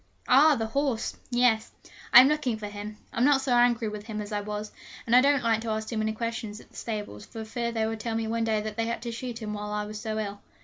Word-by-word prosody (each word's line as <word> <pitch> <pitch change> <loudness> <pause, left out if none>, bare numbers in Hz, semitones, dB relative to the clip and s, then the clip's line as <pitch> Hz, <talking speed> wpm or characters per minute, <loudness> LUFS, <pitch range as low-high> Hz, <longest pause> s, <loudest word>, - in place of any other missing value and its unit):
'Ah! 295 +4 +6
the 225 -3 -1
horse 265 0 -1
yes. 240 -3 +2 0.4
I 245 - +11
am 260 - +5
looking 290 -6 0
for 215 - -6
him. 205 +1 -7 0.2
I'm 235 - +1
not 280 0 +5
so 265 -2 0
angry 240 -1 +3
with 210 0 -6
him 215 -2 -4
as 210 +1 -6
I 205 -1 -1
was, 210 +1 -5 0.3
and 235 - +3
I 250 - +8
don't 280 -1 +3
like 225 -1 +2
to 230 - -4
ask 220 0 -2
too 230 - -3
many 220 0 0
questions 225 -2 -4
at - - -17
the - - -21
stables, 210 - -5
for 225 -1 -7
fear 235 +1 -3
they 225 -1 0
may 225 0 -2
tell 225 +1 -3
me 225 0 -1
one 230 +1 -1
day 220 -1 +1
that 215 0 -6
they 225 0 0
had 230 0 -3
to 235 - -3
shoot 235 0 -5
him 210 -1 -4
while 210 0 -5
I 210 0 -2
was 210 0 -7
so 220 -1 -3
ill. 205 -1 -4
225 Hz, 275 wpm, -27 LUFS, 215-240 Hz, 0.4 s, I